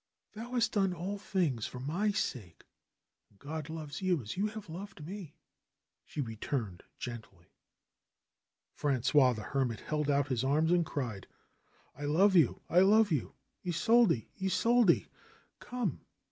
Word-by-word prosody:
"Thou 230 +4 -8
hast 240 -2 +2
done 195 -4 +1
all 190 +4 -4
things 165 - -1
for 125 - -8
my 170 +11 0
sake 120 - -3 0.7
and 100 - -27
God 150 +4 -6
loves 155 -2 -6
you 185 -3 +2
as 110 - -6
you 200 +3 +1
have 215 -1 -8
loved 175 -1 -8
me," 180 -3 -8 0.7
she 150 - -4
returned 110 -4 -4 0.2
gently, 110 -8 -9 1.2
Frangois 130 -1 +3
the 110 - -6
Hermit 125 -1 -1
held 150 -1 -2
out 140 -1 +2
his 130 -2 0
arms 155 +5 +2
and 175 -1 +4
cried: 115 -9 -4 0.7
"I 145 - -6
love 190 +7 +4
you! 160 -8 +4
I 175 - +4
love 205 +2 +5
you! 145 -7 -1 0.3
Isolde! 180 - +3 0.2
Isolde 225 +1 +3
1" - - -28 0.5
"Come 245 - -3
160 Hz, 145 wpm, -32 LUFS, 130-195 Hz, 1.2 s, love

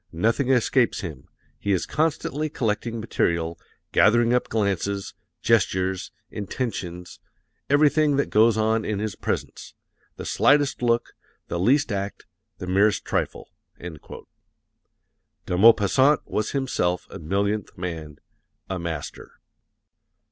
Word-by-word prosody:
Nothing 115 - 0
escapes 125 -1 +2
him. 75 -9 -8 0.3
He 100 - -1
is 95 - +1
constantly 155 -1 -1
collecting 115 -1 -2
material, 85 -6 -1 0.3
gathering 120 +2 +4
up 125 - +1
glances, 100 -2 -1 0.3
gestures, 95 -4 +1 0.2
intentions, 95 -5 -5 0.5
everything 150 +1 +4
that 140 - 0
goes 110 +1 +4
on 110 +1 +1
in 105 -1 -2
his 105 0 -3
presence - - -4 0.4
the - - -8
slightest 145 -2 +2
look, 120 -1 +1 0.4
the 85 - -2
least 130 +8 +3
act, 100 0 -4 0.3
the - - -6
merest 100 +3 +2
trifle." - - -3 0.3
De 85 +1 -12
Maupassant 115 +8 +5
was 105 - -2
himself 90 - -1
a - - -8
millionth 100 +5 -2
man, 80 -5 -6 0.5
a 95 - -2
Master. 80 -3 -6
105 Hz, 110 wpm, -24 LUFS, 90-120 Hz, 0.5 s, Maupassant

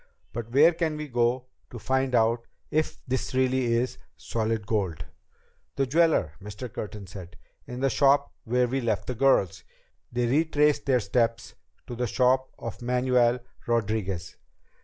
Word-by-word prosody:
But 115 -1 -5
where 155 +7 +6
can 160 -2 -1
we 150 0 -5
go 120 0 +1 0.2
to 120 - -8
find 130 +2 0
out 115 +1 +2 0.2
if 155 +1 0
this 130 0 -2
really 130 0 +2
is 125 +1 -1 0.2
solid 110 -1 -2
gold?" 100 -7 -2 0.7
"The 135 - +1
jeweler," 155 - +2
Mr. 105 +4 -8
Curtin 105 -1 -6
said, 90 -1 -10 0.3
"in 125 +1 -6
the 135 - +3
shop 140 0 +3
where 125 +2 +1
we 135 +2 -1
left 110 -5 -1
the 125 - -3
girls." 100 -8 +2 0.5
They 120 0 0
retraced 150 +2 +2
their 130 -3 +3
steps 115 +2 0 0.3
to 120 - -7
the 125 +1 -1
shop 130 +3 +2
of 115 -2 -7
Manuel 125 0 +2 0.3
Rodriguez. 105 -6 -1
125 Hz, 150 wpm, -27 LUFS, 110-130 Hz, 0.7 s, where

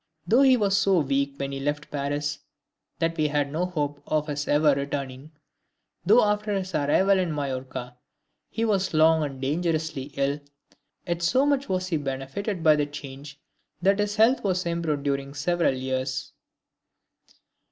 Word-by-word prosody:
Though 230 +9 +4
he 265 -2 +6
was 200 -3 +2
so 195 -1 +3
weak 140 0 0
when 140 -1 -3
he 135 - -4
left 145 +2 -3
Paris 145 +1 -2 0.6
that 165 0 0
we 155 -1 +2
had 145 -1 -1
no 170 +4 -1
hope 145 -5 -3
of 155 -1 0
his 145 -1 -4
ever 150 0 +4
returning; 140 0 -4 0.8
though 220 +5 +6
after 210 0 0
his 190 -1 -3
arrival 185 +7 +3
in 180 -3 0
Majorca 130 -3 -4 0.5
he 230 - -1
was 195 -6 0
long 160 +1 +5
and 135 -3 -5
dangerously 155 -1 -2
ill; 140 +1 0 0.7
yet 170 -1 -2
so 255 +11 +3
much 280 -1 +1
was 185 0 -1
he 165 - +1
benefited 145 +8 -4
by 155 -2 +6
the 145 -1 0
change 145 0 -9 0.4
that 195 +3 +3
big 205 0 0
health 225 +5 +3
was 185 -3 0
improved 165 -4 -1
during 140 0 -2
several 170 0 +1
years. 130 +1 -3
150 Hz, 160 wpm, -25 LUFS, 140-185 Hz, 0.8 s, he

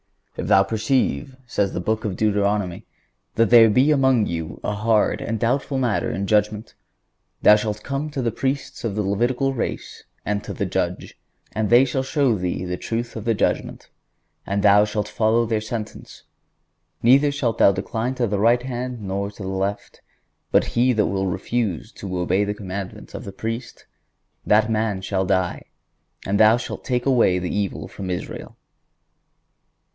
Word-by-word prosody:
"If - - -4
thou 95 - +5
perceive," 120 +5 -1
says 105 -5 -1
the - - -2
Book 110 +4 -1
of 105 -5 -2
Deuteronomy, 100 -3 0 0.5
"that 115 +1 +2
there 115 -2 +8
be 130 +8 +4
among 130 -6 +3
you 80 -3 -5
a 105 - -1
hard 110 +1 +1
and 115 -1 -3
doubtful 135 +4 0
matter 125 -5 0
in 100 - -2
judgment,... 105 +1 0 0.7
thou 105 - +8
shalt 105 0 -3
come 140 +2 -3
to 140 -3 -3
the 115 - 0
Priests 135 +5 -3
of 110 -4 -2
the 105 - 0
Levitical 120 +7 0
race 120 - -5 0.2
and 105 0 -1
to - - -6
the 100 - -1
judge,... 90 -1 -3 0.3
and 110 0 -1
they 120 +3 +6
shall 130 +1 -1
show 135 -3 +1
thee 90 -1 -3
the 90 0 -3
truth 115 +4 -4
of 110 -1 -6
the 115 -1 +2
judgment.... - - -2 0.6
And 100 0 -1
thou 105 0 +6
shalt 105 -1 -2
follow 115 +1 +2
their 110 -1 -1
sentence; 110 0 -7 0.8
neither 135 +5 +5
shalt 130 -6 -2
thou - - +7
decline 110 +6 -3
to 125 - 0
the 105 -2 -1
right 120 +3 +3
hand, 125 -2 -4
nor 100 0 -3
to 100 0 -10
the 95 - -4
left.... 95 +1 -3 0.5
But - - +4
he 125 +2 +3
that 105 -3 +2
will... 95 -1 -1
refuse 100 -1 -2
to 95 -2 -6
obey 90 +3 +1
the 105 0 -2
commandment 95 -1 -7
of - - -6
the 100 - -7
Priest,... 115 +4 -6 0.6
that 110 +1 +4
man 110 -3 0
shall 95 0 -1
die, 95 -2 0 0.6
and 100 +1 0
thou 110 +2 +6
shalt 120 - -6
take 125 -2 -1
away 120 -9 +3
the 90 -1 -3
evil 100 -3 -2
from 95 -2 -7
Israel." 90 -1 -6
110 Hz, 175 wpm, -22 LUFS, 100-120 Hz, 0.8 s, there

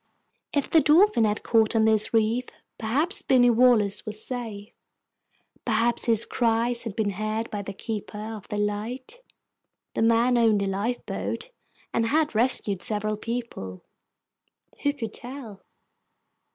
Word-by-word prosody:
If 285 - 0
the 320 - +4
Dolphin 320 - +5
had 210 0 -1
caught 225 -1 +2
on 220 -1 +4
this 220 -1 +4
reef, 225 +2 +1 0.3
perhaps 285 - 0
Binny 245 -2 +4
Wallace 225 -4 +3
was 215 0 -7
safe. 225 -5 -6 0.9
Perhaps 235 +1 +1
his 230 -1 +2
cries 235 0 +1
had 215 -4 -5
been 210 -2 0
heard 215 +3 -3
by 205 -2 -3
the 200 - -6
keeper 210 +1 -6
of 215 -1 -7
the 210 - -4
light. 225 - -4 0.7
The - - -2
man 230 +2 +3
owned 220 -3 +3
a - - -1
lifeboat, 225 - -3 0.4
and 230 0 +1
had 305 +3 +1
rescued 220 -5 +1
several 215 +2 -1
people. 215 - -6 1.0
Who 285 - +2
could 225 -7 -6
tell? 245 -6 -9
225 Hz, 140 wpm, -25 LUFS, 210-245 Hz, 1.0 s, Dolphin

